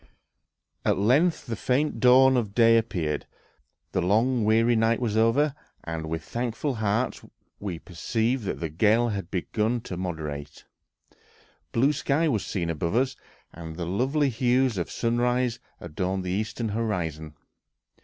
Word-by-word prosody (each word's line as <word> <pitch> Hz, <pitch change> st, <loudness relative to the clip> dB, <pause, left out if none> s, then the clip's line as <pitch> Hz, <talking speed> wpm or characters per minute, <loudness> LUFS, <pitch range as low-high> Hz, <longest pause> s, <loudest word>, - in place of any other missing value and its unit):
At -, -, +2 dB
length 140 Hz, -, +2 dB
the 115 Hz, -3 st, -3 dB
faint 135 Hz, +7 st, 0 dB
dawn 130 Hz, +1 st, +6 dB
of 110 Hz, -5 st, -1 dB
day 115 Hz, -1 st, +6 dB
appeared, 80 Hz, -10 st, -3 dB, 0.6 s
the 95 Hz, -, 0 dB
long, 115 Hz, +6 st, +2 dB
weary 115 Hz, +2 st, +3 dB
night 115 Hz, +1 st, +2 dB
was 115 Hz, -4 st, -1 dB
over, 120 Hz, +7 st, +3 dB, 0.3 s
and 80 Hz, -1 st, -4 dB
with 80 Hz, -1 st, -3 dB
thankful 120 Hz, -, -2 dB
hearts 110 Hz, +2 st, -1 dB, 0.4 s
we 95 Hz, -5 st, -4 dB
perceived 110 Hz, +8 st, -2 dB
that -, -, -3 dB
the 80 Hz, -, -3 dB
gale 110 Hz, +9 st, +3 dB
had 100 Hz, -5 st, -4 dB
begun 110 Hz, +5 st, -1 dB
to 90 Hz, -, -6 dB
moderate; 80 Hz, -5 st, -5 dB, 1.1 s
blue 135 Hz, +6 st, +3 dB
sky 150 Hz, +3 st, +1 dB
was 115 Hz, -9 st, 0 dB
seen 85 Hz, -4 st, -2 dB
above 85 Hz, +4 st, -2 dB
us, 130 Hz, +1 st, +1 dB, 0.4 s
and 80 Hz, -1 st, -8 dB
the 85 Hz, 0 st, -4 dB
lovely 130 Hz, -, +1 dB
hues 125 Hz, -2 st, +1 dB
of 85 Hz, -, -3 dB
sunrise 120 Hz, +1 st, 0 dB, 0.2 s
adorned 90 Hz, +3 st, -3 dB
the 90 Hz, -, -3 dB
eastern 110 Hz, +3 st, -2 dB
horizon. 85 Hz, -9 st, -3 dB
110 Hz, 145 wpm, -26 LUFS, 90-125 Hz, 1.1 s, dawn